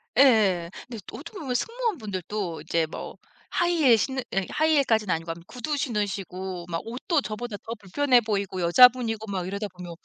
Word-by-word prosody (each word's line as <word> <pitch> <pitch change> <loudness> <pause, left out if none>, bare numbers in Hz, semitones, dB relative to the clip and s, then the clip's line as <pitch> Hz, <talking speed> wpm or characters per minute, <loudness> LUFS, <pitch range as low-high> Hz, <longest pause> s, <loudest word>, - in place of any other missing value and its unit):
예예. 215 -10 +5 0.2
근데 235 -3 -6
어떻게 335 +8 -9
보면 270 -6 -3
승무원 460 - -1
분들도 195 - -4
이제 165 -1 0
뭐 - - -8 0.3
하이힐 325 -9 +4
신는 260 +4 -1
예 195 0 +1
하이힐까지는 270 - +2
아니고 165 0 -3
암 165 - -6
구두 295 +5 -3
신으시고 195 -7 -3
막 165 -1 -2
옷도 265 +7 -1
저보다 215 -1 -5
더 225 - -7
불편해 245 +6 +3
보이고 200 -4 -2
여자분이고 225 +3 +5
막 185 -2 -2
이러다 200 +2 -3
보면 180 -1 -8
220 Hz, 380 characters per minute, -26 LUFS, 185-260 Hz, 0.3 s, 예예